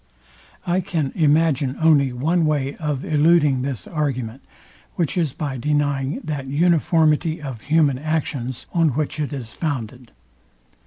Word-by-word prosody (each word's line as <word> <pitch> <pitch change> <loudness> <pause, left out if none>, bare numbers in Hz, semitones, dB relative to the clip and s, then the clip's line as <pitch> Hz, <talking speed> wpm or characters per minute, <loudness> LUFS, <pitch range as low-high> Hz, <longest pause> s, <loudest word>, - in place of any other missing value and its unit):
I 175 +1 +1
can 165 -7 -2
imagine 150 -4 +2
only 150 -5 +4
one 160 +8 +1
way 145 -2 -1
of 150 -4 -3
eluding 150 -3 +3
this 130 -8 -4
argument, 135 -5 -3 0.5
which 170 +1 -1
is 165 -6 +1
by 140 -4 -4
denying 145 0 -1
that 145 -3 -4
uniformity 160 +1 +2
of 135 -7 -7
human 150 -4 +2
actions, 140 -5 -3
on 165 -2 +3
which 155 +1 -2
it 150 -1 -2
is 125 -6 -6
founded. 125 -5 -4
145 Hz, 135 wpm, -22 LUFS, 135-160 Hz, 0.5 s, only